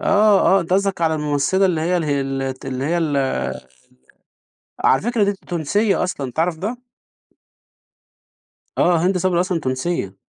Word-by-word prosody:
آه، 205 -1 +4
آه. 195 0 +4
أنت 170 +2 -4
قصدَك 195 -1 +1
على 160 -1 +2
الممثلة 150 +6 +1
اللي 165 -4 0
هي 180 +3 +1
ال 165 - -1
هي 140 -2 0
ال 135 0 -3
الت 130 0 -5
اللي 130 0 -3
هي 170 +3 0
ال 150 -4 0 1.7
على 130 - +4
فكرة 235 -2 +1
دي 200 - +1
تونسية 195 +3 -1
أصلًا، 140 -8 -3
تعرف 160 +3 -1
ده؟ 220 +7 -3 2.0
آه، 175 0 +4
هند 185 0 +2
صبري 180 -1 +1
أصلًا 180 -3 -1
تونسية. 130 - -3
170 Hz, 155 wpm, -20 LUFS, 145-190 Hz, 2.0 s, آه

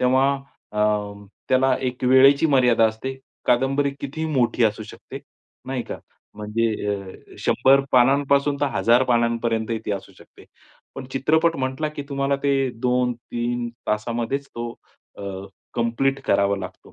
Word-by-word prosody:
तेव्हा 130 +2 +3 0.4
अ, 105 - -5 0.7
त्याला 130 0 +3
एक 125 -1 -3
वेळेची 135 +4 +6
मर्यादा 125 -5 +4
असते. 130 +5 -5 0.3
कादंबरी 135 +3 +2
कितीही 155 +3 -4
मोठी 125 -3 +2
असू 110 0 0
शकते, 105 - -10 0.5
नाही 130 -2 -2
का? - - -7 0.4
म्हणजे 105 +2 -1 0.3
अ, 100 -2 -9
100 135 +1 +4
पानांपासून 140 +3 +3
तर 145 - +2
1000 120 +2 +4
पानांपर्यंतही 115 -2 0
ती - - -1
असू 100 - -6
शकते. - - -18 0.5
पण 135 - -7
चित्रपट 160 +5 +2
म्हटला 130 +3 -2
की 150 -1 -6
तुम्हाला 140 0 0
ते 140 - +2 0.3
2-3 120 -1 -1 0.2
तासामध्येच 115 +6 -2
तो 120 0 -5 0.5
अ, - - -7 0.5
कंप्लीट 125 +4 0
करावा 100 0 +2
लागतो. 95 -1 -10
125 Hz, 130 wpm, -23 LUFS, 115-135 Hz, 0.7 s, वेळेची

